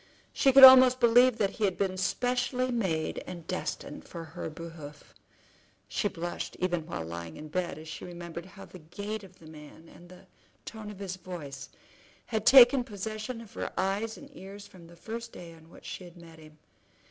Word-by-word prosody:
She 270 Hz, -, +4 dB
could 270 Hz, +1 st, +8 dB
almost 255 Hz, -1 st, +10 dB
believe 245 Hz, 0 st, +5 dB
that 200 Hz, -4 st, +1 dB
he 215 Hz, -, -1 dB
had 190 Hz, -2 st, -1 dB
been 190 Hz, -2 st, -1 dB
specially 250 Hz, +6 st, -1 dB
made 185 Hz, -10 st, -1 dB
and 175 Hz, -3 st, -8 dB
destined 185 Hz, -, -5 dB
for 170 Hz, -2 st, -9 dB
her 160 Hz, 0 st, -7 dB
behoof. 155 Hz, -2 st, -11 dB, 0.7 s
She 105 Hz, -, -1 dB
blushed 175 Hz, -3 st, -5 dB
even 175 Hz, -3 st, -1 dB
while 80 Hz, -, -5 dB
lying 85 Hz, 0 st, -7 dB
in 155 Hz, -, -9 dB
bed 175 Hz, +1 st, -3 dB
as 155 Hz, +1 st, -11 dB
she 160 Hz, -, -8 dB
remembered 170 Hz, 0 st, -8 dB
how 195 Hz, +1 st, -12 dB
the 185 Hz, -, -13 dB
gait 205 Hz, +6 st, -6 dB
of 185 Hz, -1 st, -15 dB
the 165 Hz, -, -17 dB
man, 155 Hz, +1 st, -13 dB
and 175 Hz, +1 st, -16 dB
the 180 Hz, +1 st, -15 dB, 0.4 s
tone 220 Hz, -2 st, -8 dB
of 210 Hz, -, -9 dB
his 190 Hz, -2 st, -6 dB
voice, 145 Hz, -7 st, -8 dB, 0.6 s
had 220 Hz, -2 st, -3 dB
taken 260 Hz, 0 st, +8 dB
possession 215 Hz, +2 st, -6 dB
of 225 Hz, -, -14 dB
her -, -, -4 dB
eyes 200 Hz, +4 st, -1 dB
and 285 Hz, 0 st, -14 dB
ears 200 Hz, +2 st, -10 dB
from 175 Hz, -4 st, -15 dB
the 170 Hz, -, -15 dB
first 230 Hz, +6 st, -7 dB
day 170 Hz, -1 st, -10 dB
on 160 Hz, 0 st, -18 dB
which -, -, -16 dB
she -, -, -7 dB
had 175 Hz, 0 st, -14 dB
met 165 Hz, -1 st, -14 dB
him. 155 Hz, -1 st, -16 dB
185 Hz, 195 wpm, -29 LUFS, 165-220 Hz, 0.7 s, almost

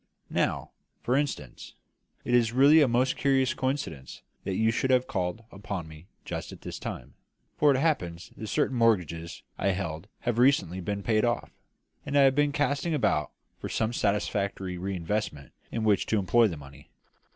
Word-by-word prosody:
Now, -, -, -1 dB, 0.3 s
for 125 Hz, -, +1 dB
instance, 135 Hz, -, -3 dB, 0.5 s
it 120 Hz, -, -1 dB
is 115 Hz, -2 st, +3 dB
really 145 Hz, +5 st, +7 dB
a 145 Hz, -, +5 dB
most 125 Hz, +2 st, +2 dB
curious 135 Hz, -2 st, +2 dB
coincidence 130 Hz, -, -4 dB, 0.2 s
that 95 Hz, -, -2 dB
you 110 Hz, +3 st, +3 dB
should 130 Hz, +3 st, -1 dB
have 130 Hz, -1 st, +4 dB
called 95 Hz, -1 st, -3 dB
upon 100 Hz, -4 st, -5 dB
me 80 Hz, +3 st, -13 dB, 0.2 s
just -, -, -5 dB
at -, -, -11 dB
this -, -, -7 dB
time, -, -, -7 dB, 0.4 s
for 145 Hz, -1 st, +4 dB
it 135 Hz, -, +2 dB
happens 95 Hz, -, -1 dB
that 110 Hz, -, -7 dB
certain 140 Hz, +2 st, 0 dB
mortgages 90 Hz, -8 st, 0 dB, 0.2 s
I 100 Hz, -, 0 dB
held 90 Hz, -2 st, -4 dB
have 120 Hz, -1 st, -1 dB
recently 120 Hz, -, +3 dB
been 100 Hz, +2 st, -3 dB
paid 110 Hz, 0 st, +2 dB
off, 120 Hz, 0 st, -1 dB, 0.5 s
and 145 Hz, 0 st, -1 dB
I -, -, +7 dB
have 135 Hz, -1 st, +5 dB
been 145 Hz, +1 st, +2 dB
casting 145 Hz, +3 st, 0 dB
about 75 Hz, -, +1 dB, 0.3 s
for -, -, -5 dB
some 110 Hz, +2 st, -1 dB
satisfactory 100 Hz, -3 st, -1 dB
re 95 Hz, +2 st, -3 dB
investment 85 Hz, -4 st, -3 dB, 0.2 s
in 115 Hz, -, -2 dB
which 105 Hz, -2 st, +2 dB
to 110 Hz, -, +1 dB
employ 115 Hz, +4 st, +4 dB
the 85 Hz, -6 st, -5 dB
money. 70 Hz, 0 st, -14 dB
110 Hz, 175 wpm, -28 LUFS, 90-130 Hz, 0.5 s, really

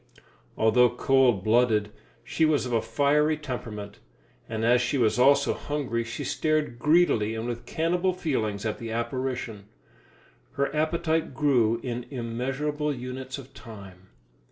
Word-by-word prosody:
Although 120 Hz, +3 st, +4 dB
cold 125 Hz, -7 st, +3 dB
blooded, 110 Hz, -2 st, +2 dB, 0.3 s
she 150 Hz, +6 st, -1 dB
was 155 Hz, -4 st, +3 dB
of 125 Hz, -, -4 dB
a 115 Hz, -, +2 dB
fiery 150 Hz, +2 st, +2 dB
temperament, 110 Hz, -8 st, -7 dB, 0.5 s
and 110 Hz, 0 st, -2 dB
as 120 Hz, +1 st, +4 dB
she 135 Hz, +3 st, 0 dB
was 120 Hz, -1 st, +2 dB
also 140 Hz, +3 st, +4 dB
hungry, 135 Hz, -6 st, -3 dB
she 115 Hz, -, -6 dB
stared 155 Hz, -6 st, -1 dB
greedily 150 Hz, -9 st, +3 dB
and 110 Hz, +1 st, -4 dB
with 120 Hz, -1 st, -5 dB
cannibal 175 Hz, +3 st, 0 dB
feelings 115 Hz, -, -2 dB
at 110 Hz, -, -2 dB
the 115 Hz, -, -6 dB
apparition. 115 Hz, -2 st, -3 dB, 0.9 s
Her 140 Hz, +1 st, -1 dB
appetite 160 Hz, -1 st, 0 dB
grew 120 Hz, -6 st, +2 dB
in 120 Hz, -1 st, -4 dB
immeasurable 135 Hz, +5 st, -2 dB
units 130 Hz, 0 st, -6 dB
of 135 Hz, -1 st, -12 dB
time. 100 Hz, -5 st, -12 dB
125 Hz, 135 wpm, -26 LUFS, 115-150 Hz, 0.9 s, Although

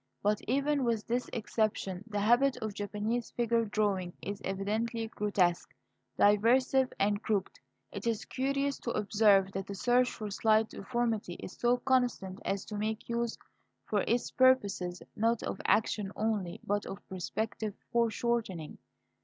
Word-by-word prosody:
But 210 Hz, 0 st, +2 dB
even 280 Hz, +2 st, +1 dB
with 230 Hz, -3 st, 0 dB
this 245 Hz, +2 st, -1 dB
exception 210 Hz, -4 st, -1 dB
the 205 Hz, -2 st, -2 dB
habit 245 Hz, +5 st, +4 dB
of 220 Hz, -4 st, -4 dB
Japanese 210 Hz, +4 st, -2 dB
figure 235 Hz, -1 st, +1 dB
drawing 200 Hz, -4 st, 0 dB
is 200 Hz, 0 st, -5 dB
evidently 220 Hz, +4 st, -2 dB
grotesque, 200 Hz, -5 st, 0 dB, 0.4 s
derisive, 250 Hz, +5 st, +4 dB
and 205 Hz, +1 st, +2 dB
crooked. 205 Hz, -4 st, -1 dB, 0.3 s
It -, -, -5 dB
is 225 Hz, -2 st, -1 dB
curious 275 Hz, +1 st, -1 dB
to -, -, -4 dB
observe 205 Hz, -2 st, +4 dB
that 195 Hz, 0 st, -4 dB
the 200 Hz, -, -5 dB
search 245 Hz, +4 st, +3 dB
for 215 Hz, -2 st, -6 dB
slight 220 Hz, +2 st, +3 dB
deformity 225 Hz, -4 st, -2 dB
is -, -, -8 dB
so 245 Hz, +1 st, +2 dB
constant 245 Hz, -7 st, 0 dB
as 195 Hz, 0 st, -2 dB
to 210 Hz, -, -6 dB
make 215 Hz, +2 st, -3 dB
use, 235 Hz, 0 st, -1 dB, 0.5 s
for 205 Hz, -2 st, +1 dB
its 235 Hz, +1 st, +1 dB
purposes, 200 Hz, -9 st, +2 dB
not 230 Hz, +1 st, +1 dB
of -, -, -4 dB
action 210 Hz, -2 st, +2 dB
only, 210 Hz, -5 st, -1 dB
but 205 Hz, 0 st, -1 dB
of 195 Hz, -, -8 dB
perspective 210 Hz, +3 st, -3 dB, 0.2 s
foreshortening. 230 Hz, -7 st, 0 dB
215 Hz, 145 wpm, -31 LUFS, 200-235 Hz, 0.5 s, habit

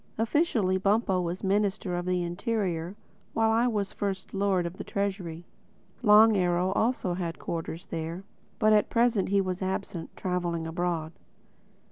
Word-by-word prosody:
Officially 225 Hz, -, +1 dB
Bumpo 195 Hz, -1 st, +2 dB
was 175 Hz, +1 st, -4 dB
Minister 200 Hz, -1 st, 0 dB
of 175 Hz, 0 st, -3 dB
the 180 Hz, -1 st, +1 dB
Interior; 180 Hz, -1 st, -2 dB, 0.4 s
while 225 Hz, 0 st, +3 dB
I 230 Hz, +2 st, +3 dB
was 210 Hz, -4 st, -1 dB
First 195 Hz, -2 st, -4 dB
Lord 195 Hz, -3 st, +1 dB
of 170 Hz, +2 st, -5 dB
the -, -, -5 dB
Treasury. 190 Hz, -4 st, -3 dB, 0.6 s
Long 215 Hz, +1 st, +7 dB
Arrow 180 Hz, 0 st, +2 dB
also 220 Hz, -3 st, 0 dB
had 175 Hz, -2 st, -3 dB
quarters 165 Hz, 0 st, -5 dB
there; 165 Hz, +3 st, -5 dB, 0.3 s
but 215 Hz, -1 st, +4 dB
at 210 Hz, -, +3 dB
present 230 Hz, -5 st, +2 dB
he 200 Hz, 0 st, +3 dB
was 185 Hz, -1 st, -3 dB
absent, 190 Hz, -3 st, -3 dB
traveling 175 Hz, -3 st, -2 dB
abroad. 165 Hz, -1 st, -2 dB
190 Hz, 145 wpm, -28 LUFS, 175-210 Hz, 0.6 s, Long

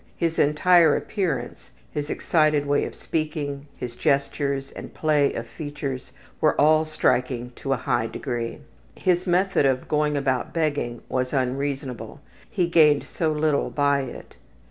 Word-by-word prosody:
His 165 Hz, -1 st, -1 dB
entire 160 Hz, +2 st, +5 dB
appearance, 165 Hz, -, -3 dB, 0.2 s
his 145 Hz, 0 st, -4 dB
excited 155 Hz, -3 st, +2 dB
way 145 Hz, 0 st, +1 dB
of -, -, -7 dB
speaking, 150 Hz, -3 st, -3 dB
his 120 Hz, -1 st, -6 dB
gestures 140 Hz, -1 st, 0 dB
and -, -, -9 dB
play 150 Hz, -2 st, +2 dB
of 115 Hz, -, -4 dB
features 135 Hz, 0 st, -6 dB, 0.3 s
were 155 Hz, -, +3 dB
all 155 Hz, +2 st, +5 dB
striking 125 Hz, -5 st, 0 dB
to 135 Hz, -, -4 dB
a -, -, 0 dB
high 120 Hz, -2 st, 0 dB
degree. 115 Hz, 0 st, -4 dB, 0.4 s
His 180 Hz, 0 st, +1 dB
method 180 Hz, -4 st, +3 dB
of 130 Hz, -1 st, 0 dB
going 150 Hz, -1 st, +1 dB
about 135 Hz, 0 st, -1 dB
begging 145 Hz, -7 st, -1 dB
was 130 Hz, +1 st, -2 dB
unreasonable; 135 Hz, -2 st, -2 dB, 0.3 s
he 185 Hz, -4 st, +1 dB
gained 155 Hz, -4 st, +4 dB
so 160 Hz, -2 st, -1 dB
little 150 Hz, -1 st, +1 dB
by 140 Hz, -1 st, +2 dB
it. 130 Hz, -, -9 dB
145 Hz, 145 wpm, -24 LUFS, 130-155 Hz, 0.4 s, entire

